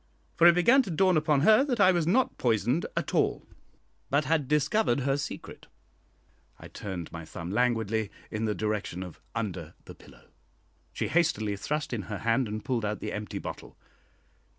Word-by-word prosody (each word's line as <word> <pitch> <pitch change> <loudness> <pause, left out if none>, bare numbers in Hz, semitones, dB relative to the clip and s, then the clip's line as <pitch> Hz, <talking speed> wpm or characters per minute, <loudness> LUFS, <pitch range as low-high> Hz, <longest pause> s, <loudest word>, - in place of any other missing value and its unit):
For 170 - +6
it 170 - +7
began 235 +10 +5
to 225 - -6
dawn 185 +2 +3
upon 150 -2 +2
her 215 - +6
that 255 -5 -1
I 190 -2 +6
was 170 -3 0
not 250 +9 +2
poisoned 120 - +1
at - - -2
all, - - +1 0.6
but 145 +2 +2
had 155 -4 +1
discovered 150 - +2
her 135 +1 +1
secret. 145 - -7 0.9
I - - -11
turned 95 -5 -6
my 80 0 -7
thumb 85 +2 -7
languidly 110 -2 0 0.2
in 110 0 -2
the 105 -1 -1
direction 105 -4 -3
of 90 -4 -11
under 90 -8 -4
the - - -10
pillow. - - -18 0.6
She - - -3
hastily 110 -12 +1
thrust 150 +7 -3
in 115 - -2
her 105 - -3
hand 115 +3 +1
and 105 0 -5
pulled 125 -4 -1
out 105 0 -2
the 105 - -5
empty 105 -2 -5
bottle. - - -8
125 Hz, 175 wpm, -28 LUFS, 105-165 Hz, 0.9 s, it